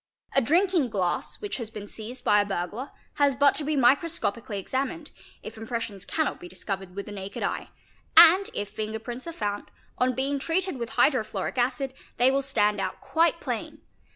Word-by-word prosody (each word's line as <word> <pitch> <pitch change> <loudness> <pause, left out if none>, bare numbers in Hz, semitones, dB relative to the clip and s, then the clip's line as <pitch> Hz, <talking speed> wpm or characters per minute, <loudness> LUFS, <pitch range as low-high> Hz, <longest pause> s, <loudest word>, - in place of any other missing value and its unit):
A 275 - +6
drinking 340 - +2
glass 190 - -1
which 410 - -3
has 230 -4 -4
been 210 -2 -8
seized 225 +4 -8
by 210 0 +5
a - - +1
burglar 205 +7 -3 0.3
has 280 -2 +4
but 280 +1 +5
to 305 - -1
be 305 +1 0
microscopically 255 - +1
examined, 275 - -3 0.3
if - - -8
impressions 225 -3 -4
cannot 315 -2 -1
be 175 - -9
discovered 185 0 -5
with 200 - -4
the - - -8
naked 195 -1 -6
eye, - - -2 0.5
and 370 +5 +9
if 205 - -2
finger 215 +1 -4
prints 240 +5 -7
are - - -3
found, 205 -8 -3 0.3
on 255 0 +2
being 275 +2 0
treated 335 +1 -1
with 230 -1 -4
hydrofluoric 220 -4 +1
acid, 260 +2 0 0.2
they 250 +2 +5
will 275 +1 +2
stand 210 -7 +1
out - - -3
quite 335 +1 +2
plain. - - -5
245 Hz, 180 wpm, -27 LUFS, 210-285 Hz, 0.5 s, and